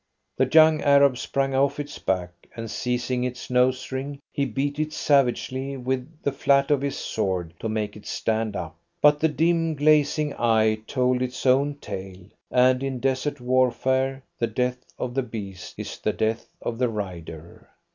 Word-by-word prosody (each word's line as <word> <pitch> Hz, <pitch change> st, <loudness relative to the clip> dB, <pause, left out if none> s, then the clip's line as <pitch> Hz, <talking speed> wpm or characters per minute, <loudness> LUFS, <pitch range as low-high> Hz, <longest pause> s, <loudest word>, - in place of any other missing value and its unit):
The 130 Hz, -, +2 dB
young 155 Hz, 0 st, +6 dB
Arab 140 Hz, -2 st, +5 dB
sprang 135 Hz, 0 st, -1 dB
off 140 Hz, +2 st, +2 dB
its 145 Hz, 0 st, -6 dB
back, 90 Hz, -2 st, -1 dB, 0.2 s
and, 115 Hz, -1 st, -6 dB
seizing 125 Hz, 0 st, -1 dB
its 125 Hz, 0 st, -5 dB
nose 125 Hz, +1 st, +2 dB
ring, 135 Hz, +2 st, -4 dB, 0.2 s
he 140 Hz, -, 0 dB
beat 140 Hz, +4 st, -2 dB
it 155 Hz, 0 st, -1 dB
savagely 135 Hz, -1 st, +1 dB
with 130 Hz, +4 st, -4 dB
the 140 Hz, -, +1 dB
flat 140 Hz, +1 st, +2 dB
of 145 Hz, -2 st, +3 dB
his 140 Hz, -1 st, -2 dB
sword 95 Hz, -6 st, -2 dB
to 110 Hz, -, -3 dB
make 105 Hz, -1 st, -2 dB
it 105 Hz, -, -12 dB
stand 110 Hz, -2 st, -1 dB
up. 85 Hz, -3 st, -5 dB, 0.2 s
But 150 Hz, 0 st, +5 dB
the 160 Hz, -, +3 dB
dim, 165 Hz, +1 st, +1 dB
glazing 150 Hz, 0 st, +3 dB
eye 110 Hz, -2 st, +3 dB
told 125 Hz, -1 st, +1 dB
its 125 Hz, +1 st, -3 dB
own 140 Hz, +3 st, +3 dB
tale, 95 Hz, -8 st, -8 dB, 0.2 s
and 125 Hz, 0 st, +4 dB
in 135 Hz, -2 st, -3 dB
desert 135 Hz, +3 st, -1 dB
warfare 130 Hz, +1 st, +1 dB, 0.2 s
the 115 Hz, -, +1 dB
death 125 Hz, +1 st, -1 dB, 0.2 s
of 125 Hz, -1 st, -3 dB
the 135 Hz, -, +1 dB
beast 100 Hz, -6 st, -7 dB
is -, -, -6 dB
the -, -, 0 dB
death 110 Hz, +1 st, -1 dB, 0.2 s
of 115 Hz, 0 st, -3 dB
the 125 Hz, -2 st, +2 dB
rider. 85 Hz, -6 st, -7 dB
130 Hz, 170 wpm, -25 LUFS, 115-140 Hz, 0.2 s, young